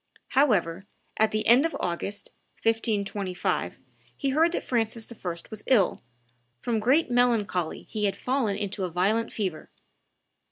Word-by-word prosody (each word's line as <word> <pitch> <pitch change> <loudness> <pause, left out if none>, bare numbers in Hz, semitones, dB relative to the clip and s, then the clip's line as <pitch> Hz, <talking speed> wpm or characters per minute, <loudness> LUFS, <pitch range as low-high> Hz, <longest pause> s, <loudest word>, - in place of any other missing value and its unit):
However, 195 - +2 0.3
at 220 0 +4
the 215 0 -2
end 245 +4 +6
of 330 - -1
August, 195 +4 -4 0.3
1525, 205 -5 -1 0.4
he 275 - -1
heard 320 +5 +3
that - - -2
Francis 225 -2 -1
I. 200 -6 -5 0.2
was 215 -1 -6
ill: 220 -8 +3 0.6
"from 225 - -1
great 255 +6 +3
melancholy 225 -9 +1
he 210 -2 -2
had 200 - +1
fallen 250 -6 0
into 200 -1 -3
a 180 - -1
violent 200 +7 +1
fever." 185 -7 -3
215 Hz, 135 wpm, -27 LUFS, 195-245 Hz, 0.6 s, end